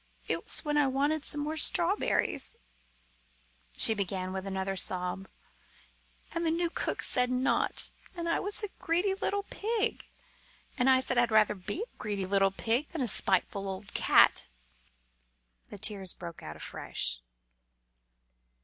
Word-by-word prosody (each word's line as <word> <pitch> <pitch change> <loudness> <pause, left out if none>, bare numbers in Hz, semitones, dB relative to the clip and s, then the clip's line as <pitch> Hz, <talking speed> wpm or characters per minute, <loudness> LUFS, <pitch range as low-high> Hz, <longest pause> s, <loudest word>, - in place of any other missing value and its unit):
"It - - -1
was - - -4
when 295 0 0
I 290 -2 +4
wanted 285 +3 0
some 295 - 0
more 300 +2 -2
of 315 - +1
the - - +10
strawberries," 350 -6 +1 1.2
she 225 - +7
began, 190 -2 -3
with 190 0 -5
another 190 0 -2
sob, 185 +1 -1 1.0
"and 335 - -2
the 330 - +1
new 335 +1 0
cook - - -2
said 250 -1 +4
not, 255 +1 +1 0.3
and 340 0 -3
I 335 - +1
was 410 +2 -1
a 415 - -3
greedy 355 +4 +1
little 400 +1 -2
pig: 450 +1 -2 0.7
and 260 -1 +2
I 260 0 +5
said 255 -1 +1
I'd 240 -1 +3
rather 215 -1 +4
be 205 - -5
a 485 - -15
greedy 205 -2 -3
little 195 0 +3
pig 230 +8 -1
than 330 - -4
a 250 - 0
spiteful 195 0 0
old 195 +1 -7
cat!" - - +4 1.2
The - - -9
tears 195 -2 0
broke 170 -2 -9
out 75 - -8
afresh. 60 -5 -4
250 Hz, 155 wpm, -30 LUFS, 195-325 Hz, 1.2 s, the